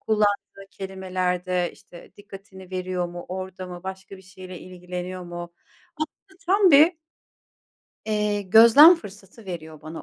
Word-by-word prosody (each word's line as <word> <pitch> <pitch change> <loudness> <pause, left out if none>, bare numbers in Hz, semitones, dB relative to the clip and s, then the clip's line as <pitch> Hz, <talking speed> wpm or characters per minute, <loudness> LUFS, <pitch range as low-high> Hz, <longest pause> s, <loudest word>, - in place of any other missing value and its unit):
kullandığı 205 -2 -1
kelimelerde, 185 -2 -3
işte, 175 - -16
dikkatini 195 -2 -13
veriyor 185 -1 -3
mu, 175 0 -9
orada 185 0 -6
mı, 175 -1 -9
başka 190 +1 -8
bir 190 - -16
şeyle 185 -1 -11
ilgileniyor 180 0 -7
mu? 175 0 -8 0.4
Aslında 365 +5 -8
tam 390 0 +4
bir 310 +4 +7 1.1
eee, 210 -1 -1
gözlem 230 - +8
fırsatı 205 - -13
veriyor 160 -4 -8
bana. 155 +1 -8
190 Hz, 125 wpm, -24 LUFS, 180-205 Hz, 1.1 s, gözlem